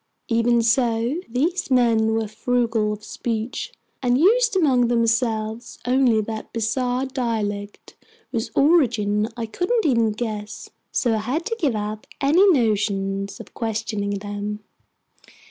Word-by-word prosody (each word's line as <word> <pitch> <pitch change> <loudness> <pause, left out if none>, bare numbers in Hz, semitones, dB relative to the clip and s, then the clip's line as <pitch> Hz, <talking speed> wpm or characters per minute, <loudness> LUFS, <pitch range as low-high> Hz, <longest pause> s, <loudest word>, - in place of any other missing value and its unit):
Even 235 0 +3
so, 230 +4 +1
these 320 +10 -1
men 230 -3 +3
were 225 -1 -1
frugal 225 0 0
of 210 0 -6
speech 230 +1 -4 0.3
and 245 -1 +2
used 455 - +4
among 265 -9 +3
themselves 230 -1 0
only 250 -3 +3
that 220 0 -6
bizarre 245 +3 -1
dialect 215 -6 -4 0.4
whose 225 -2 -2
origin 230 -9 +3
I 230 - -2
couldn't 365 - -1
even 230 -6 +3
guess. 215 -1 -5 0.2
So 240 -3 +1
I - - +1
had 260 +10 -2
to 460 - -2
give 280 - +1
up 210 0 -4
any 335 +9 +5
notions 200 - 0
of - - -11
questioning 210 -2 -2
them. 205 +1 -5
230 Hz, 130 wpm, -22 LUFS, 215-255 Hz, 0.4 s, any